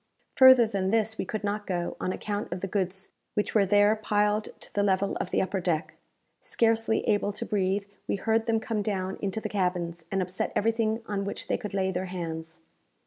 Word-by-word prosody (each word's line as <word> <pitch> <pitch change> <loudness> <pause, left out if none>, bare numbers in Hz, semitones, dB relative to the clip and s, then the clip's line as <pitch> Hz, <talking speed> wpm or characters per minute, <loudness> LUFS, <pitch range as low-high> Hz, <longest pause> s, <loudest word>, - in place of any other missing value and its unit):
Further 260 -2 +8
than 195 -3 -1
this 220 +1 +1
we - - -1
could 215 +2 -4
not 205 +1 -2
go, 175 -2 -2
on 185 - -1
account 205 0 -4
of 180 +1 -4
the 195 - -2
goods 190 -1 -2 0.3
which 210 - 0
were 200 -3 +4
there 205 +2 +5
piled 210 0 +1
to - - -10
the 205 - +1
level 195 0 +1
of - - -3
the - - +1
upper 190 +1 -2
deck. 170 -3 -1 0.5
Scarcely 225 -1 +1
able 205 -1 +2
to 205 - -4
breathe, 200 -1 0 0.2
we - - 0
heard 225 +3 0
them 225 -1 +2
come 220 -1 -2
down 190 -2 -2
into 200 +1 -2
the - - -3
cabins, 175 -4 -2
and 195 - +1
upset 185 0 -2
everything 225 +1 +1
on 200 -2 -2
which 200 - -4
they - - 0
could 205 -1 -5
lay 190 -1 +1
their 185 +1 -2
hands. 165 -2 -6
200 Hz, 205 wpm, -28 LUFS, 185-215 Hz, 0.5 s, Further